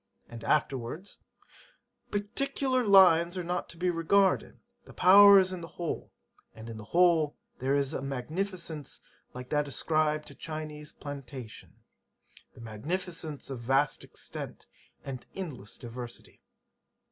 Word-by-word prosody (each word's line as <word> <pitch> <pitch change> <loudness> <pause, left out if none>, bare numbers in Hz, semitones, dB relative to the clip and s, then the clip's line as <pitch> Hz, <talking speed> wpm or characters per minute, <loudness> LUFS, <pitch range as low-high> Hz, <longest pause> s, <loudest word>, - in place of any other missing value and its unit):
' - - -39
And 115 -1 -8
afterwards, 145 +5 -1 0.9
'Particular 255 +5 -1
lines 185 -4 +6
are 180 - -2
not 175 +1 -3
to 170 - -11
be 180 +1 +1
regarded; 185 +4 +2 0.2
the - - -14
power 200 +2 +9
is 185 -1 +3
in 180 - -5
the 165 - -7
whole; 170 -2 -4 0.4
and 110 +1 -8
in 110 - -8
the 110 - -9
whole 165 +1 +3 0.2
there 135 +2 +1
is 140 +1 0
a - - -3
magnificence 155 +3 -4 0.4
like 125 0 -7
that 150 -1 +1
ascribed 155 +2 0
to - - -11
Chinese 155 -1 -6
plantation, 135 -5 -9 0.8
the - - -12
magnificence 155 - -4
of 130 - -5
vast 135 +4 +1
extent - - -8 0.4
and 130 -3 -6
endless 145 - -7
diversity.' 120 0 -9
155 Hz, 135 wpm, -29 LUFS, 135-180 Hz, 0.9 s, power